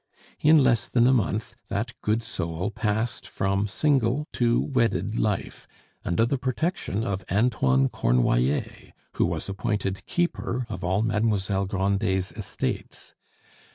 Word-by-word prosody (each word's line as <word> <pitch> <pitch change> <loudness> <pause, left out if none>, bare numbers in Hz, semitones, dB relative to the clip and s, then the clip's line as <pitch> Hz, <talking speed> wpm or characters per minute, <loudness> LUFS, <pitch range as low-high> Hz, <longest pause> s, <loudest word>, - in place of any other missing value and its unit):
In 155 +2 +6
less 120 -4 +2
than 120 -1 +3
a 130 - +5
month 110 -2 0 0.2
that 110 +4 -2
good 110 +2 0
soul 90 -2 -3
passed 110 +2 -2
from 100 +1 0
single 135 +4 +1
to 120 -1 +2
wedded 115 -4 0
life 105 -5 -2 0.4
under 90 +6 +2
the 135 +3 -1
protection 130 - -1
of 100 -3 -2
Antoine 95 - +3
Cornoiller, 60 +2 0 0.2
who - - +3
was - - -3
appointed 100 -1 -2
keeper 150 -7 -1
of 95 -4 -6
all 95 +4 +1
Mademoiselle 105 -3 0
Grandet's 95 -1 0
estates. - - -5
105 Hz, 125 wpm, -26 LUFS, 95-120 Hz, 0.4 s, In